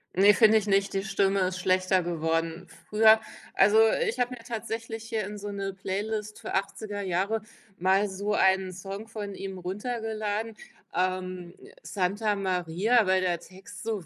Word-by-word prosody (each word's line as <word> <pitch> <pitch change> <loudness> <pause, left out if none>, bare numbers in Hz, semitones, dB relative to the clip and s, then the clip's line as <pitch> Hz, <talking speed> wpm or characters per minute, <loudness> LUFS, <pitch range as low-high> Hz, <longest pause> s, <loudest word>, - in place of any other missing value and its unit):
Ne, 200 +2 +6
finde 220 -1 +6
ich 210 - -7
nicht, 195 0 +2
die 195 0 -1
Stimme 195 -1 +1
ist 185 0 0
schlechter 185 0 +2
geworden. 165 0 -2 0.2
Früher 220 +1 +6 0.4
also, 205 +3 +5 0.3
ich 240 +3 -2
habe 245 +1 +1
mir 230 - -14
tatsächlich 225 0 -5
hier 220 -2 -2
in 205 +1 -7
so 205 +1 -6
'ne 195 -1 -4
Playlist 210 +2 -4
für - - -6
80er 205 +1 -3
Jahre 195 +4 0 0.4
mal 190 +3 +3
so 200 +2 -3
einen 190 -1 +3
Song 195 +4 -7
von 205 -3 -6
ihm 195 -1 -6
runtergeladen, 215 +2 -3 0.4
ähm, 185 -1 -2 0.3
Santa 205 +2 -1
Maria, 190 +4 +1
weil 190 0 +3
der 175 -2 0
Text 190 +2 -12
so 215 -6 -3
195 Hz, 160 wpm, -27 LUFS, 185-215 Hz, 0.4 s, Ne